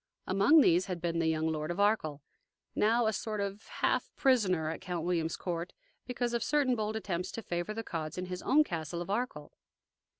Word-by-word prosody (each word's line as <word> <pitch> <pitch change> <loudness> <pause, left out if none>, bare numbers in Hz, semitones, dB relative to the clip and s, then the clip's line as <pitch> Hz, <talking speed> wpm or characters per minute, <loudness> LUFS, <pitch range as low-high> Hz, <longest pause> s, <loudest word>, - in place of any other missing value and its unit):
Among 200 +12 +5
these 175 -6 +4
had 180 -2 -3
been 170 -1 -1
the 165 - +1
young 160 0 +1
Lord 155 0 -2
of 175 +3 -3
Arkell, 155 -9 +1 0.5
now 230 +3 +3
a 220 - +2
sort 215 0 -3
of 200 +1 -4
half - - 0
prisoner 200 - +2
at 160 - -6
Count 175 -3 -3
William's 165 -2 0
court 175 -1 -4 0.3
because 245 -1 -2
of 235 -1 0
certain 285 -4 +2
bold 215 -1 -2
attempts 180 -4 -3
to 230 - -5
favor 175 +2 -3
the 225 - -3
Cods 160 -5 -5
in 180 - -3
his 180 0 -5
own 305 +3 +4
castle 170 - -4
of 195 - -6
Arkell. 205 -10 -3
185 Hz, 200 wpm, -31 LUFS, 170-220 Hz, 0.5 s, Among